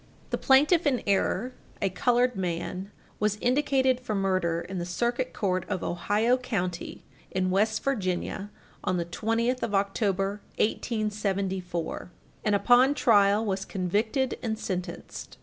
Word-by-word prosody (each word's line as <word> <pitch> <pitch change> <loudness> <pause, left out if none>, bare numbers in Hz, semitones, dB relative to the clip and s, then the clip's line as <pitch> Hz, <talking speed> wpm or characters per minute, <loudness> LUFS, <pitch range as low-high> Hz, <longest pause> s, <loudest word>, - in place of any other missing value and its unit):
The - - +1
plaintiff 300 +5 +4
in 255 -4 +1
error, 200 +4 +1 0.3
a 195 - 0
colored 245 +4 +2
man, 185 +1 -3 0.3
was 210 -1 +1
indicted 260 +2 +2
for 235 -4 -3
murder 185 -4 +1
in 185 +1 -5
the - - -2 0.2
Circuit 245 +2 0
Court 185 -3 -1
of 185 - -2
Ohio 215 +7 +1
County 185 -9 -3 0.3
in 185 0 0
West 215 +3 +1
Virginia, 195 -5 -2 0.3
on 185 - 0
the 170 - -1
20th 230 +7 -1
of 210 -3 -1
October, 195 0 0 0.2
1874, 195 -7 -2 0.3
and, 210 -1 +2
upon 245 +7 +5
trial, 205 -3 +4
was 195 -2 -1
convicted 215 +9 -1
and 220 -2 -2
sentenced. 180 -4 -5
205 Hz, 130 wpm, -27 LUFS, 185-245 Hz, 0.3 s, upon